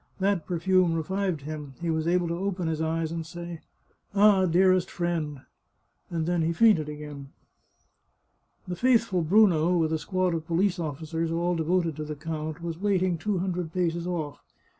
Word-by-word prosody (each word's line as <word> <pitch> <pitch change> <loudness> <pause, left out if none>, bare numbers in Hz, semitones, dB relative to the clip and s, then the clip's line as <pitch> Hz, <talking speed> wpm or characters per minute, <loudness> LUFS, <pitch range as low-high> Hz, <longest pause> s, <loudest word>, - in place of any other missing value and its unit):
That 190 -5 0
perfume 180 0 +2
revived 185 0 -1
him; 145 -2 -7
he 170 -1 -1
was 160 0 -1
able 175 0 +2
to - - -1
open 185 -1 -2
his 160 -1 -1
eyes 160 0 -1
and 165 -1 -3
say 170 0 -8 0.3
" - - -30
Ah, 200 -2 +5
dearest 185 +1 +3
friend! 165 -5 -2 0.3
" - - -45
and 165 -2 -2
then 175 0 +1
he 165 +1 +1
fainted 170 -6 +4
again. 150 -2 -8 1.4
The 180 - -3
faithful 230 -4 +2
Bruno, 175 -1 +4
with 160 -1 +1
a 160 - 0
squad 185 +3 0
of 160 -1 -4
police 180 +2 +1
officers, 160 +1 -3
all 170 +2 0
de 165 - -1
voted 170 -2 +1
to 155 - -3
the 150 0 -5
count, 155 +1 -5
was 165 -1 -4
waiting 185 -4 +1
two 210 +2 -1
hundred 180 -2 -2
paces 170 -1 -1
off. 155 -5 -4
170 Hz, 180 wpm, -27 LUFS, 160-185 Hz, 1.4 s, Ah